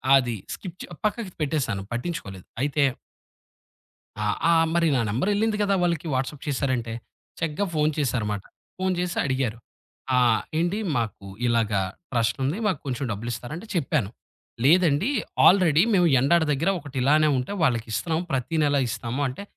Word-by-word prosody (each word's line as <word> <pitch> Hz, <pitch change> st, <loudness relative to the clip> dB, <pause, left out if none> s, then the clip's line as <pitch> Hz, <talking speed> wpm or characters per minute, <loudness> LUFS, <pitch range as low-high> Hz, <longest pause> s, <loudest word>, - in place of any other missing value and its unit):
అది 125 Hz, -3 st, +2 dB, 0.2 s
స్కిప్ 185 Hz, -2 st, -8 dB
చె -, -, -5 dB, 0.2 s
పక్కకి 210 Hz, -3 st, -1 dB
పెట్టేసాను 135 Hz, -10 st, -1 dB
పట్టించుకోలేదు. 120 Hz, -, -5 dB, 0.2 s
అయితే 145 Hz, +1 st, +1 dB, 1.4 s
ఆ! -, -, 0 dB, 0.3 s
ఆహ్, 165 Hz, -1 st, +4 dB
మరి 170 Hz, -1 st, +3 dB
నా -, -, +2 dB
నంబర్ 130 Hz, -, 0 dB
ఎళ్ళింది 215 Hz, +1 st, +1 dB
గదా! 200 Hz, -1 st, +2 dB
వాళ్ళకి 170 Hz, -2 st, 0 dB
వాట్సాప్ 135 Hz, +2 st, -3 dB
చేశారంటే. 130 Hz, -4 st, -1 dB, 0.5 s
చక్కగా 165 Hz, +5 st, -1 dB
ఫోను 155 Hz, 0 st, +2 dB
చేశారు 125 Hz, -6 st, 0 dB
మాట. 100 Hz, -2 st, -4 dB, 0.4 s
ఫోను 185 Hz, 0 st, 0 dB
చేసి 180 Hz, -1 st, -2 dB
అడిగారు. 130 Hz, -4 st, -1 dB, 0.6 s
ఆహ్, 120 Hz, -3 st, +4 dB, 0.2 s
"ఏండి 175 Hz, +5 st, 0 dB, 0.2 s
మాకు 105 Hz, -4 st, -3 dB, 0.2 s
ఇలాగా 110 Hz, -4 st, +2 dB, 0.3 s
ట్రస్టుంది 130 Hz, -, 0 dB
మాకు 185 Hz, -9 st, 0 dB
కొంచెం 130 Hz, +1 st, -2 dB
డబ్బులిస్తారా?" 120 Hz, +5 st, -5 dB
అంటే 200 Hz, -, -9 dB
చెప్పాను 145 Hz, -, 0 dB, 0.5 s
లేదండి. 165 Hz, -, +4 dB, 0.4 s
ఆల్రెడీ 170 Hz, -4 st, +6 dB
మేము 180 Hz, -3 st, +4 dB
ఎండాడ 165 Hz, +6 st, +4 dB
దగ్గర 165 Hz, +7 st, +1 dB
ఒకటి 140 Hz, -3 st, -10 dB
ఇలానే 155 Hz, +3 st, +4 dB
ఉంటే 125 Hz, +10 st, -2 dB
వాళ్లకి 120 Hz, -6 st, +2 dB
ఇస్తున్నాం 160 Hz, +8 st, -1 dB
ప్రతి 135 Hz, +5 st, -1 dB
నెల 145 Hz, -1 st, +2 dB
ఇస్తాము 115 Hz, +3 st, -3 dB
అంటే, 130 Hz, +9 st, -7 dB
140 Hz, 145 wpm, -25 LUFS, 120-170 Hz, 1.4 s, ఆల్రెడీ